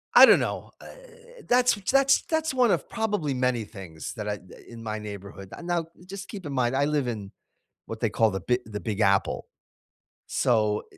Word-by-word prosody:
I - - +12
don't - - +7
know, - - -3
eh, - - -11 0.6
that's 250 0 +4
w 200 -2 -8
that's 275 0 +4
that's 320 -3 -1
one 250 -4 +4
of - - 0
probably 205 -10 -1
many 125 -3 0
things 95 -7 -8
that 105 -1 -5
I 105 - 0 0.2
eh, - - -14
in 115 -1 -10
my 110 -1 -3
neighborhood. 100 -2 -8
N 170 - -9
now 175 -2 0 0.2
just 190 +1 -8
keep 195 -5 -8
in 145 - -4
mind, 125 -1 +1
I 140 +1 +3
live 145 -3 0
in 105 -5 -4 0.6
what 115 - -6
they 115 - +2
call 110 0 +2
the 95 - -3
Bi 125 +6 +1
the 105 -2 -6
Big 105 -2 -4
Apple. 100 -1 +2 0.8
So, 105 -3 +1
eh - - -19
120 Hz, 210 wpm, -26 LUFS, -, 0.8 s, I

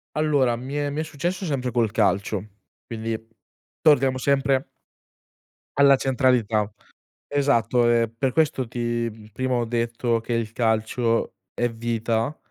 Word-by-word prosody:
Allora, 145 -6 +2
mi 130 +3 -7
è 145 0 0
mi 145 +2 -4
è - - 0
successo 170 +5 -3
sempre 130 -6 -2
col 115 -3 +1
calcio, 100 -2 0 0.4
quindi 115 0 -3 0.6
torniamo 135 -4 +4
sempre 135 0 +1 1.1
alla 140 -1 +7
centralità, 125 -6 +1 0.6
esatto. 125 -4 +2
Ehm, 115 -1 +1
per 130 +1 0
questo 145 -3 +1
ti 115 -2 -3
prima 130 +3 -1
ho 120 -1 +1
detto 115 0 0
che 115 - -5
il 115 -2 -1
calcio 115 0 0 0.2
è 120 - 0
vita, 115 +3 -1
120 Hz, 130 wpm, -24 LUFS, 115-135 Hz, 1.1 s, alla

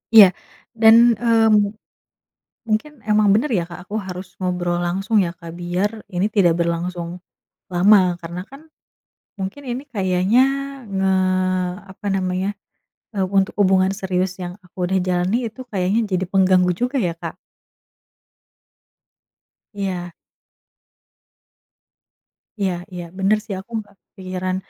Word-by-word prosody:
Iya 195 -3 +9 0.4
dan, 230 +1 +7
eee, 225 0 +3
mu 205 -1 +3 0.9
mungkin 230 +7 -2
emang 210 -1 +3
bener 225 +9 +3
ya 180 -5 +2
Kak 175 +1 -9
aku 210 - -6
harus 185 -1 -8
ngobrol 175 -1 -1
langsung 195 +5 +1
ya, 175 - 0
Kak? 165 -1 -9
Biar 180 +5 -2
ini 180 +1 0
tidak 190 -6 +3
berlangsung 170 +1 -2 0.5
lama 180 -1 +4
karena 170 +1 -7
kan 275 +2 -12 0.7
mungkin 195 +8 -6
ini 250 +2 -3
kayaknya 190 +1 +2 0.5
nge 190 -1 0 0.8
apa 195 +2 -10
namanya 190 +1 -1 0.6
e - - -2
untuk 195 +1 +1
hubungan 190 -1 +4
serius 185 -1 -1
yang 180 +2 -7
aku 180 - -23
udah 190 +1 +1
jalani 185 +6 0
itu 240 +4 -10
kayaknya 195 +3 +1
jadi 185 +1 +1
pengganggu 185 -1 +3
juga 250 +6 -1
ya, 170 -5 -1
Kak? - - -7 2.4
Iya. 185 -3 -3 2.5
Iya 190 -2 +1 0.2
iya, 175 - -5
bener 195 +3 +3
sih 215 - -6
aku 215 +5 -14
nggak 205 -2 -12
kepikiran. 185 -1 -4
190 Hz, 125 wpm, -21 LUFS, 180-210 Hz, 2.5 s, Iya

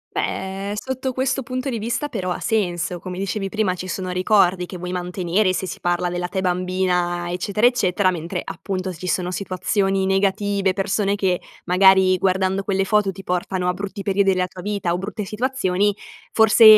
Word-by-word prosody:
Beh, 195 +1 -2
sotto 260 +3 -3
questo 265 +1 0
punto 255 +2 -3
di 230 - -2
vista 235 +7 -1
però 195 -9 -3
ha 180 - -2
senso. 180 -5 -1
Come 180 +1 -6
dicevi 195 +1 -2
prima, 210 -3 +1
ci 185 +1 -6
sono 185 0 -3
ricordi 185 -1 +3
che 185 - -7
vuoi 180 +1 -5
mantenere, 180 +2 0
se 190 - -2
si - - -6
parla 175 0 0
della 180 0 -2
te 185 +2 -3
bambina, 180 -1 0
eccetera, 200 +5 0
eccetera. 195 -6 +3
Mentre 175 +1 -4
appunto, 185 -2 -4
ci 180 +2 -7
sono 180 0 0
situazioni 195 +1 0
negative, 195 0 +1
persone 200 +1 0
che 190 -3 0 0.2
magari 185 0 +5
guardando 190 +1 +1
quelle 195 -1 0
foto 205 0 +2
ti 195 +1 -10
portano 180 0 -1
a 180 - +2
brutti 200 +2 -5
periodi 195 0 +3
della 185 0 +1
tua 180 0 -10
vita 200 -3 -1
o 175 - -1
brutte 205 +2 -4
situazioni; 205 -3 0 0.4
forse 220 +1 +5
190 Hz, 180 wpm, -22 LUFS, 180-205 Hz, 0.4 s, magari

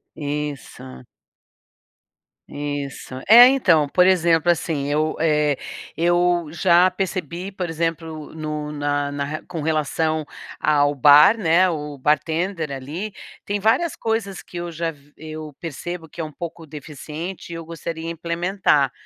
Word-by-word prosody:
Isso. 145 - -6 1.5
Isso. 145 -2 -5
É, 240 +3 +11
então, 180 - +3
por 180 +5 +4
exemplo, 170 -2 +4
assim, 160 -4 -2
eu, 155 +2 0
eh, 150 -3 +2 0.4
eu 175 0 +2
já 175 +1 +4
percebi, 185 0 -4
por 180 -3 -4
exemplo, 165 -1 -4
no 150 -1 -4
na 145 -1 -1
na 145 0 -3
ra 150 +2 -4
com 170 -3 -5
relação 155 0 0 0.3
ao 145 -1 +3
bar, 145 - +7
né, 180 -1 +3
o 150 -3 -5
bartender 160 +4 0
ali, 150 +10 -5 0.3
tem 205 0 -1
várias 255 - +2
coisas, 220 -4 -2
que 175 - -10
eu 175 0 -4
já 165 0 -2
v 145 -1 -22
eu 155 -2 -8
percebo, 165 +1 -6
que 170 - -14
é - - -1
um 155 - -6
pouco 165 +2 -8
deficiente, 155 +4 -8
e - - -5
eu 165 - -6
gostaria 165 0 -6
implementar, 170 -4 +1
160 Hz, 140 wpm, -22 LUFS, 150-175 Hz, 1.5 s, É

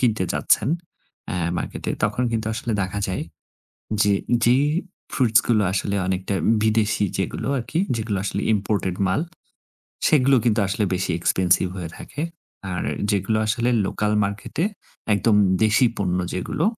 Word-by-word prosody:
কিনতে 110 -6 +2
যাচ্ছেন 110 - +2 0.6
অ্যা - - -2 0.2
মার্কেটে, - - -4
তখন 105 +4 0
কিন্তু 110 -1 -1
আসলে 115 0 -3
দেখা 95 +2 -3
যায় 95 - -2 0.8
যে 105 - +3 0.3
যেই 125 +4 +4 0.5
ফ্রুটসগুলো 115 -3 +3
আসলে 100 +1 -1
অনেকটা 95 +1 -1 0.3
বিদেশী 110 -1 +2
যেগুলো - - -2
আরকি, 140 +7 -3 0.2
যেগুলো 110 -3 -2
আসলে 100 - -2
ইম্পোর্টেড 100 -3 -1
মাল, 95 +6 +1 0.9
সেগুলো 135 -2 +4
কিন্তু 110 -2 +3
আসলে 100 +2 0
বেশি 95 0 -1
এক্সপেনসিভ 95 +1 +2
হয়ে 85 -3 -5
থাকে। 145 - -6 0.5
আর 90 - -2 0.3
যেগুলো 100 +1 +1
আসলে 115 +3 +1 0.2
লোকাল 105 +2 -1
মার্কেটে 100 - -3 0.5
একদম 105 +2 +3 0.3
দেশী 110 +4 +4
পণ্য 90 -2 0 0.2
যেগুলো, 95 - -2
105 Hz, 130 wpm, -23 LUFS, 95-115 Hz, 0.9 s, যেই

